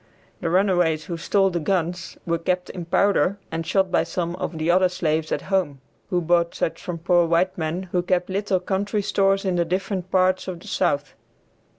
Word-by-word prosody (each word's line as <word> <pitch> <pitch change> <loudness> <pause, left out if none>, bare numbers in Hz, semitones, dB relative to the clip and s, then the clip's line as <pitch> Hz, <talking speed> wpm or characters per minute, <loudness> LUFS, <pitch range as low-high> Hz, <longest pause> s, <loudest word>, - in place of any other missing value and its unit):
The 170 - -2
runaways 175 -4 +2
who 170 - -4
stole 195 +3 +2
the 170 - -1
guns 175 0 -2
were 170 -1 0
kept 180 +1 -1
in 180 -3 -6
powder 195 +1 +2
and 165 0 -3
shot 190 -2 +1
by - - +3
some 175 -1 -3
of 170 - -4
the 160 +2 +1
other 185 +1 +4
slaves 160 -3 -1
at - - -1
home, 160 -8 +1 0.3
who 180 -1 +1
bought 170 0 +2
such 165 - -2
from 175 -3 -4
poor 170 +1 +3
white 170 +3 +2
men 165 +2 -2
who 180 - +2
kept 180 0 0
little 195 0 0
country 200 +3 -1
stores 195 0 +2
in 185 -2 0
the 170 - +3
different 185 +1 -2
parts 185 0 +2
of 180 -2 -5
the - - -14
South. 145 +1 0
180 Hz, 200 wpm, -23 LUFS, 170-190 Hz, 0.3 s, other